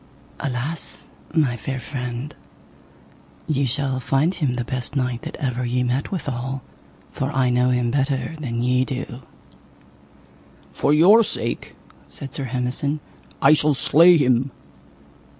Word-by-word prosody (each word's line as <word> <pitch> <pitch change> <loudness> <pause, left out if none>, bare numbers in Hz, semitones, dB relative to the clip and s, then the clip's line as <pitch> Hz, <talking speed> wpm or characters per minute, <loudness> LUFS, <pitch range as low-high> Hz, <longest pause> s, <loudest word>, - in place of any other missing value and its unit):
Alas, 140 +5 -4 0.2
my 150 -7 +2
fair 130 +3 -4
friend, 125 +1 -5 1.1
ye 140 -3 +1
shall 130 +1 0
find 140 +7 +1
him 145 -9 -1
the 125 - -1
best 125 +3 -5
knight 125 -3 -1
that - - -7
ever 125 -2 -2
ye 125 +1 0
met 125 +3 -1
withal, 135 -6 -3 0.5
for 135 +2 -2
I 130 -2 +2
know 125 +1 +3
him 125 -1 +1
better 135 +1 0
than 120 -5 -2
ye 125 +1 +3
do. 130 -2 -5 1.5
For 145 - +1
your 190 +10 +7
sake, - - -3 0.3
said 135 - -6
Sir 140 - -3
Hemison, 125 +4 -2 0.4
I - - +8
shall 150 -1 +3
slay 170 +6 +6
him. 130 -2 +2
130 Hz, 135 wpm, -22 LUFS, 125-145 Hz, 1.5 s, I